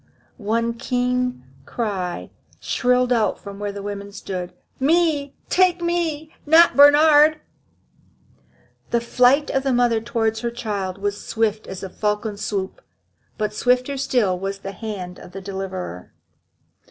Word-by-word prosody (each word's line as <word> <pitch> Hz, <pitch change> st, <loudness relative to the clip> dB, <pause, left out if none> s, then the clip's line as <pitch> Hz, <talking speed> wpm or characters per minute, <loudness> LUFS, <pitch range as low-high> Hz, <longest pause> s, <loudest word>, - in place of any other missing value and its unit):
One 230 Hz, +2 st, 0 dB
keen 250 Hz, -, -1 dB, 0.2 s
cry 195 Hz, -6 st, -3 dB, 0.3 s
shrilled 250 Hz, 0 st, +1 dB
out 220 Hz, -3 st, +1 dB
from 200 Hz, 0 st, -9 dB
where 205 Hz, 0 st, -3 dB
the 200 Hz, 0 st, -7 dB
women 200 Hz, 0 st, -6 dB
stood: 185 Hz, -3 st, -6 dB, 0.3 s
"Me! 295 Hz, -1 st, +2 dB
take 365 Hz, -1 st, +3 dB
me! 335 Hz, -3 st, -2 dB
not 325 Hz, +3 st, +6 dB
Bernhard!" 295 Hz, +1 st, +7 dB, 1.5 s
The 235 Hz, -, +2 dB
flight 250 Hz, +5 st, +3 dB
of 270 Hz, -, +1 dB
the 270 Hz, 0 st, 0 dB
mother 240 Hz, -2 st, +2 dB
towards 225 Hz, -1 st, -1 dB
her 235 Hz, +1 st, -2 dB
child 205 Hz, -6 st, -4 dB
was 205 Hz, +1 st, -3 dB
swift 220 Hz, -1 st, -1 dB
as 190 Hz, -, -7 dB
the 190 Hz, -, -6 dB
falcon's 210 Hz, 0 st, -2 dB
swoop. 195 Hz, -2 st, -3 dB, 0.6 s
But 210 Hz, -1 st, -2 dB
swifter 250 Hz, +4 st, +1 dB
still 245 Hz, -9 st, +1 dB
was 195 Hz, +1 st, -3 dB
the 195 Hz, 0 st, -7 dB
hand 190 Hz, -3 st, -7 dB
of 180 Hz, -, -13 dB
the 195 Hz, -, -7 dB
deliverer. 190 Hz, -, -6 dB
230 Hz, 135 wpm, -22 LUFS, 200-270 Hz, 1.5 s, Bernhard